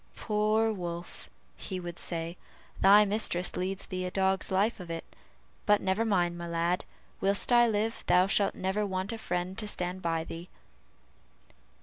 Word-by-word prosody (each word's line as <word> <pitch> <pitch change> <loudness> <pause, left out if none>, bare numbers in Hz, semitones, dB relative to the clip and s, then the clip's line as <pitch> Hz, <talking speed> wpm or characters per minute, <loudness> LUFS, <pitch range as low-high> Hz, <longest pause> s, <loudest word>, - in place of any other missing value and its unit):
"Poor 215 +1 +1
Wolf," 175 -2 -6 0.3
he 185 -2 -6
would 175 -1 -6
say, 165 0 -3 0.4
"thy 205 +2 +7
mistress 195 -4 0
leads 190 +1 -3
thee 185 -1 -4
a 180 - -2
dog's 190 0 +1
life 200 +4 +1
of 180 -2 -9
it; 165 0 -5 0.6
but 210 -1 +5
never 190 +4 0
mind, 175 -5 +1
my 170 - -5
lad, 170 +2 0 0.3
whilst 200 +5 +1
I 240 0 +6
live 220 +1 -1
thou 180 +1 +5
shalt 195 +1 +2
never 190 +3 -1
want 190 +1 -2
a 225 - -6
friend 180 -1 -3
to 215 - -4
stand 180 -2 0
by 165 -2 -1
thee!" 165 +2 -8
190 Hz, 160 wpm, -29 LUFS, 175-210 Hz, 0.6 s, thy